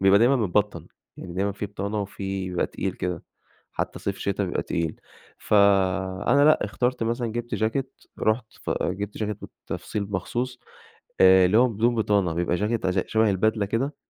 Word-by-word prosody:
بيبقى 95 +1 +6
دايمًا 125 +4 +4
متبطن، 100 -5 0 0.3
يعني 90 -1 -8
دايمًا 100 +2 0
في 100 +1 -4
بطانة 100 +1 -3
وفي 95 -1 -4
بيبقى 90 -1 0
تقيل - - -3
كده، 90 -2 -4 0.5
حتى - - -3
صيف 100 -1 -3
شتا 100 0 -1
بيبقى 90 - -2
تقيل، 85 -2 -3 0.4
فأنا 100 +5 +3
لأ 155 - +5
اختارت 120 +4 -1
مثلًا 120 +1 -1
جِبت 120 0 -3
جاكيت، 120 +5 -2 0.2
رُحت 110 +1 +1 0.2
ف - - -4
جِبت 100 +3 -3
جاكيت 105 -1 -3
بالتفصيل 100 -1 -6
مخصوص، 120 +6 -3 0.6
آآ، 95 0 +7
اللي 100 +5 +3
هو 125 +1 +6
بدون 115 +3 +1
بطانة، 100 -6 +1
بيبقى 85 +1 0
جاكيت 105 +1 -1
ز 95 +1 +1
شبه 110 -1 +3
البدلة 105 +2 +1
كده 130 +8 -2
100 Hz, 165 wpm, -25 LUFS, 95-115 Hz, 0.6 s, آآ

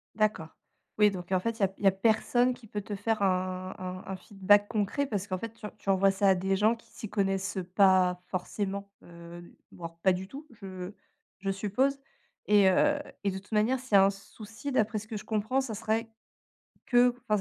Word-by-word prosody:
D'accord. 215 -7 0 0.5
Oui, 210 - +7
donc 185 -2 -7
heu, - - +3
en - - +3
fait, 230 +4 -3
il - - -5
y - - +6
a 190 - -5
il - - -11
y - - +8
a - - +7
personne 230 +5 +2
qui 245 -3 -15
peut 205 0 -4
te 205 +1 -6
faire 205 +1 -1
un 185 0 -1
un 185 0 -6
un - - -3
feedback 205 +2 +3
concret 220 +7 -1
parce 205 -6 -2
qu'en 185 -2 -3
fait 230 +3 -5
tu 220 - -10
tu - - -6
envoies 195 0 +4
ça 195 +1 +1
à 190 - +5
des 190 +1 0
gens 215 +4 +3
qui 230 - -21
s'y 215 - -8
connaissent, 195 -2 -1
heu, 190 - -1
pas 185 -1 +3
forcément, 200 +2 -4
heu, 170 0 -12 0.2
voire 165 -1 -9
pas 190 - +5
du 185 +1 -5
tout, 280 +8 -10
je 190 -3 -8 0.5
je 195 +1 -3
suppose, 215 +8 0 0.5
et 205 -2 +5
heu, 290 +10 +3 0.2
et 200 - +1
de 190 - -5
toute 200 +3 -13
manière, 225 +5 +2
s'il 260 -4 -10
y - - +7
a 195 0 +8
un 200 - +3
souci, 215 +6 -9
d'après 215 -4 +1
ce 215 - -11
que 220 -1 -5
je - - -8
comprends, 220 +5 0
ça 240 -5 -5
serait 225 +1 -2 0.8
que 245 0 +5 0.2
enfin, 210 - +3
200 Hz, 230 wpm, -29 LUFS, 190-220 Hz, 0.8 s, y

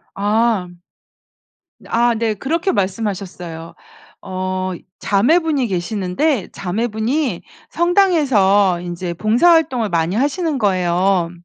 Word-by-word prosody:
아. 210 -1 +1 1.2
아 235 0 +2
네. 220 -1 -1
그렇게 330 - -1
말씀하셨어요. 185 - -4 0.5
어 185 0 -3 0.3
자매분이 285 - +2
계시는데 200 - -1
자매분이 220 - -2 0.3
성당에서 270 - +3
인제 175 0 -5
봉사활동을 245 - +3
많이 170 0 0
하시는 290 - 0
거예요. 185 -3 +1
210 Hz, 230 characters per minute, -18 LUFS, 185-265 Hz, 1.2 s, 성당에서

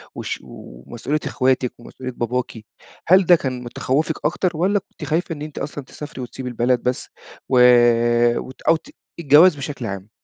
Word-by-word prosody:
والش - - -4
ومسؤولية 115 - -6
إخواتِك 130 -1 0
ومسؤولية 130 +2 -8
باباكِ. 120 -1 -3 0.4
هل 185 +2 +6
ده 175 - +7
كان 130 -5 -4
من 120 - -7
تخوفِك 150 +6 -2
أكتر، 175 +2 0
والّا 195 +5 +2
كنتِ 180 - -15
خايفة 165 +2 0
إن 145 - -11
أنتِ 150 -1 -8
أصلًا 145 0 -5
تسافري 145 0 -9
وتسيبي 125 +1 -6
البلد 120 +1 0
بس، 125 0 -2 0.4
و 130 - +3 0.8
وت 130 - -8
أو 165 - +4
ت 165 - -10 0.3
الجواز 160 +3 +6
بشكل 140 -2 -6
عام؟ 100 -1 -6
135 Hz, 165 wpm, -21 LUFS, 125-160 Hz, 0.8 s, ده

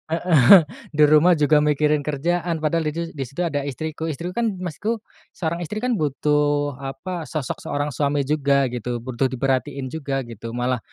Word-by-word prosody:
heeh, 165 0 +7 0.3
di 150 - +5
rumah 155 +4 +6
juga 150 0 +4
mikirin 150 0 +1
kerjaan 165 +2 -1
padahal 160 0 +1
didu 165 +2 -3
di 140 -3 -4
situ 155 +8 -4
ada 145 -4 -2
istriku. 155 +3 -4
Istriku 165 +4 -4
kan 235 +3 0 0.2
maksudku, 215 +7 -3 0.3
seorang 170 0 -2
istri 210 +7 -5
kan 250 - +1
butuh 145 -1 0
apa 150 +5 -6
sosok 150 -6 -4
seorang 145 +1 -3
suami 140 +1 0
juga 140 -2 +1
gitu, 120 0 -4
butuh 130 +1 0
diperhatiin 130 0 -2
juga 140 -4 -3
gitu. 115 -1 -8
Malah 125 0 0
150 Hz, 165 wpm, -22 LUFS, 135-165 Hz, 0.3 s, heeh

